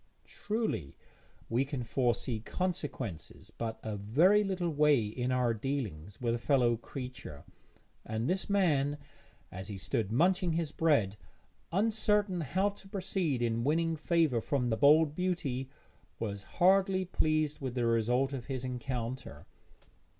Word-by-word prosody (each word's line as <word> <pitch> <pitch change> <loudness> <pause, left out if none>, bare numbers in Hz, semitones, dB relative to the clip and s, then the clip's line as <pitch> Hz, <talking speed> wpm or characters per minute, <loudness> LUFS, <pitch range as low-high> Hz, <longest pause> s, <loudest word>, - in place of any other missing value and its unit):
Truly 210 - -3 0.5
we 120 +4 +1
can 135 -2 -4
foresee 120 -1 0
consequences 140 - -4
but 115 -1 -4
a 110 -1 -3
very 155 - +4
little 185 -4 -1
way 145 -6 +4
in 125 +4 -2
our 125 -2 +2
dealings 105 - -4
with 120 -2 0
a 120 - -1
fellow 120 -3 +3
creature, 125 - -8 0.6
and 110 +2 -2
this 190 +4 -1
man, 150 -8 +2 0.5
as 95 +1 -6
he 100 - -5
stood 100 +2 -2
munching 175 +6 +2
his 165 -2 -1
bread, 130 -13 +2 0.5
uncertain 210 -1 +1
how 190 +7 +1
to 200 -1 -13
proceed 180 -9 -1
in 115 0 0
winning 165 +4 +1
favour 155 -6 +2
from 125 -1 0
the - - +2
bold 150 +4 +5
beauty, 150 -8 -2 0.5
was 100 -3 -4 0.2
hardly 190 +1 +4
pleased 155 -3 0
with 130 -2 -4
the 120 -2 +1
result 120 +4 +2
of 125 -3 -5
his 130 -2 -4
encounter. 125 - -5
135 Hz, 135 wpm, -31 LUFS, 115-170 Hz, 0.6 s, bold